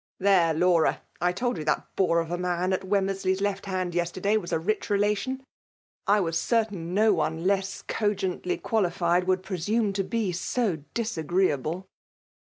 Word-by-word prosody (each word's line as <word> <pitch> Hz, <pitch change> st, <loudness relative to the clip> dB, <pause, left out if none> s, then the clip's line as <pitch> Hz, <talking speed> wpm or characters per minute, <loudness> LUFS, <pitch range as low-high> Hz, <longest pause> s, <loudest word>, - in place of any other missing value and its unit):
^ -, -, -
There, 185 Hz, -4 st, +4 dB
Laura! 170 Hz, -1 st, +3 dB, 0.2 s
I 180 Hz, +1 st, +3 dB
told 240 Hz, +1 st, -2 dB
you -, -, -3 dB
that 155 Hz, -, -1 dB
bore 170 Hz, -3 st, +3 dB
of 165 Hz, 0 st, -6 dB
a -, -, +1 dB
'nan 180 Hz, +1 st, 0 dB
at 185 Hz, -, 0 dB
Wemmeraley*s 190 Hz, -1 st, 0 dB
left 200 Hz, 0 st, -2 dB
hand 185 Hz, -2 st, -2 dB
yesterday 175 Hz, +4 st, 0 dB
was 180 Hz, -5 st, -1 dB
'■a -, -, +2 dB
rich 215 Hz, +1 st, 0 dB
relation. 210 Hz, +6 st, 0 dB, 0.6 s
I 205 Hz, +1 st, +5 dB
was 165 Hz, -2 st, 0 dB
certain 200 Hz, -7 st, -1 dB
no 215 Hz, +1 st, +5 dB
one 160 Hz, 0 st, -1 dB
less 195 Hz, 0 st, 0 dB
co 210 Hz, -1 st, 0 dB
gently 185 Hz, -2 st, -2 dB
qualified 180 Hz, -4 st, +1 dB
would 185 Hz, 0 st, +1 dB
presume 200 Hz, +3 st, 0 dB
to 195 Hz, 0 st, 0 dB
be 215 Hz, -1 st, -1 dB
so 180 Hz, +2 st, -1 dB, 0.2 s
dif 225 Hz, -6 st, -2 dB
agreeable." 170 Hz, 0 st, 0 dB
190 Hz, 175 wpm, -27 LUFS, 175-205 Hz, 0.6 s, I